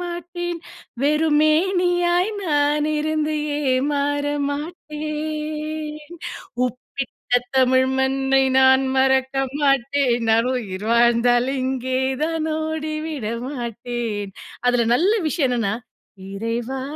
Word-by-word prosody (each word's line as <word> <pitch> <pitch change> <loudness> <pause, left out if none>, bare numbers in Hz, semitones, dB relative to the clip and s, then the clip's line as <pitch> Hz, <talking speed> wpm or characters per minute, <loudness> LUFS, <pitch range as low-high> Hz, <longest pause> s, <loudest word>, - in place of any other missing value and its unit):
மாட்டேன். 350 0 -4 0.4
வெறுமேனியாய் 345 +5 +2
நான் 295 -1 +2
இருந்தே 310 0 0 0.4
ஏமாற 285 +1 0 0.3
மாட்டேன். 305 0 -4 0.6
உப்பிட்ட 250 +1 -6 0.2
தமிழ் 260 0 +4
மண்ணை 270 0 +2 0.2
நான் 265 0 +5
மறக்க 265 0 +2 0.3
மாட்டேன். 275 -2 +2
நான் 230 +3 +3
உயிர் 205 -4 -4
வாழ்ந்தாலும் 240 +2 +3
இங்கே 260 0 -1 0.3
தான் 320 -1 -1
ஓடி 315 0 -3
விட 285 -9 -4 0.2
மாட்டேன்". 235 -5 -4 0.3
அதுல 245 -2 +3
நல்ல 355 +11 +3 0.2
விஷயம் 290 -3 +1
என்னனா, 225 -4 0 0.6
"இறைவா 235 +5 -3
280 Hz, 90 wpm, -22 LUFS, 250-310 Hz, 0.6 s, நான்